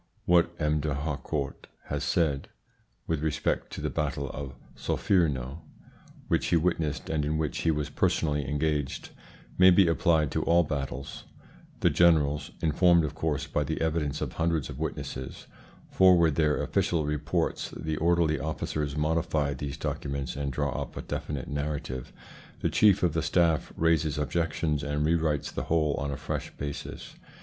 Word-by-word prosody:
What 85 -1 +4
M. 75 -1 +1
D'Harcourt 70 -1 -3 0.2
has - - -3
said 75 -5 0 0.6
with 80 -3 -1
respect 75 -1 -1
to - - -5
the - - -1
battle 70 -2 -2
of 70 -2 -7 0.2
Solferino, 75 -7 0 0.7
which - - +1
he - - +3
witnessed 85 -2 -1
and 80 -2 0
in 75 +2 0
which 80 -1 -2
he 80 - +1
was 75 -2 -1
personally 75 -3 0
engaged, 75 -2 -1 0.5
may 95 0 +9
be 95 0 +6
applied 80 -3 +2
to - - 0
all 85 +1 +4
battles 70 -2 -5 0.6
"The - - +4
generals 75 -4 +3
(informed, 85 +1 +4
of 75 - -4
course, 75 -3 -1
by - - -1
the - - -3
evidence 75 -2 -1
of 70 -5 -3
hundreds 80 -3 0
of - - -9
witnesses) 65 0 -5 0.5
forward 90 -4 +5
their 75 -1 +2
official 80 -3 0
reports; 75 0 -1
the 80 -1 -4
orderly 85 -2 +2
officers 75 0 -3
modify 75 -2 +1
these 70 0 -5
documents 70 -3 -3
and 70 0 -2
draw 70 +1 -1
up 70 - -7
a - - -4
definite 70 -3 -4
narrative; 70 -3 -4 0.5
the - - +1
chief 100 -3 +4
of 85 -3 +3
the 80 - 0
staff 80 -1 +2
raises 80 -2 +2
objections 75 0 0
and 75 +1 -1
re 80 - +3
writes 75 -3 0
the - - -4
whole 80 -3 +2
on 70 - -2
a 70 - -3
fresh - - -4
basis. 70 0 -6
75 Hz, 160 wpm, -28 LUFS, 70-80 Hz, 0.7 s, may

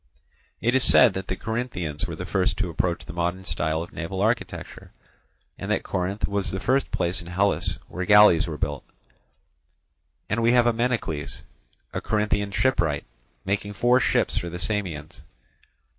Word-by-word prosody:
It 120 +2 +2
is 130 -1 +4
said - - +7
that 95 0 -5
the - - -2
Corinthians 100 - -3
were - - -5
the - - -6
first 95 -1 0
to 95 -4 -1
approach 85 +1 -1
the 75 - -8
modern 85 +2 -2
style 80 0 -1
of 85 - -12
naval 95 +3 -5
architecture, 110 +4 -2 0.7
and - - -5
that - - 0
Corinth 95 +3 -2
was 100 -2 -1
the 95 +2 -3
first 130 +7 +1
place 90 +1 -1
in 85 - -11
Hellas 100 +3 0
where 90 - -4
galleys 105 -4 +6
were 80 -2 -5
built; 70 0 -3 1.4
and 105 +3 -1
we 115 +1 +4
have 120 -1 +5
Ameinocles, 115 - -1 0.5
a - - -3
Corinthian 105 -1 0
shipwright, 100 - +1 0.4
making 100 +1 -2
four 120 +5 +3
ships - - +1
for 85 - -2
the 85 - -6
Samians. 90 -4 -4
95 Hz, 160 wpm, -25 LUFS, 85-110 Hz, 1.4 s, said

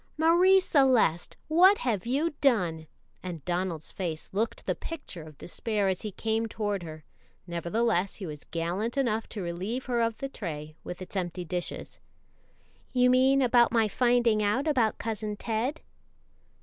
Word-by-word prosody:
"Marie 350 +4 +5
Celeste, 260 - +2
what 365 +6 +6
have 230 -4 -1
you 290 +7 +1
done?" 175 - +2 0.3
and 170 -5 -7
Donald's 175 -3 -2
face 165 -4 -4
looked 220 +4 -2
the - - +1
picture 295 - -7
of 155 -2 -12
despair 210 +2 -2
as 185 -1 -1
he 215 - -4
came 225 +3 -1
toward 205 -3 -2
her; 155 -2 -9 0.4
nevertheless, 185 +3 0
he 200 - -6
was 150 -3 -7
gallant 180 - -2
enough 230 -5 0
to 205 -4 -5
relieve 190 +9 -3
her 240 -2 0
of 230 -1 0
the 275 - -4
tray, 155 - -6
with 180 +1 -6
its 185 - -12
empty 180 -1 -3
dishes. 175 +2 -5 0.9
"You 250 -1 +4
mean 265 +2 +4
about 240 -1 +4
my 225 -2 +3
finding 240 -1 +2
out 210 +9 +1
about 245 -8 +2
Cousin 215 -1 -3
Ted?" 230 +8 -2
215 Hz, 155 wpm, -28 LUFS, 180-250 Hz, 0.9 s, what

